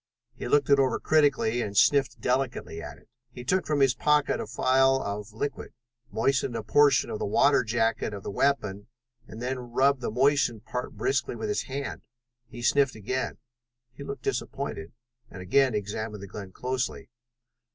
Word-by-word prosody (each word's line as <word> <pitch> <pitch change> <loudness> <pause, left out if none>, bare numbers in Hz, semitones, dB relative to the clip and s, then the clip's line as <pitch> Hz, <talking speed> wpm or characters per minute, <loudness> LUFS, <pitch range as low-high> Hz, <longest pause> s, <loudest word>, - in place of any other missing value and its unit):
He 125 - -6
looked 145 +2 +2
it 140 - +6
over 135 -1 +2
critically 140 -6 +2
and 100 -3 -4
sniffed 140 +2 +3
delicately 125 -10 -2
at - - -8
it. - - -23 0.2
He 125 0 -9
took 185 +8 0
from 150 -2 +1
his 135 -2 +5
pocket 150 +3 +2
a - - -4
phial 130 +3 +3
of 105 -2 -5
liquid, 130 +7 -5 0.4
moistened 130 +1 0
a 115 - -3
portion 140 +6 +4
of 105 - -4
the - - -2
water 140 +7 +4
jacket 115 -1 0
of 100 -2 -7
the - - -5
weapon, 105 -5 0 0.4
and 115 +2 -9
then 130 +1 -2
rubbed 135 +2 +3
the - - -2
moistened 125 -2 +1
part 125 +3 -4
briskly 395 +1 -1
with 430 - -4
his 420 - -1
hand. 135 +1 -5 0.5
He 120 +1 -9
sniffed 140 +1 +3
again. 125 +5 -3 0.6
He 140 - -9
looked 140 - -7
disappointed, 80 +1 -4 0.4
and 95 - -10
again 130 +5 +3
examined 105 0 -4
the - - -7
gun 100 -1 -8
closely. 125 +3 -3
125 Hz, 170 wpm, -27 LUFS, 110-140 Hz, 0.6 s, it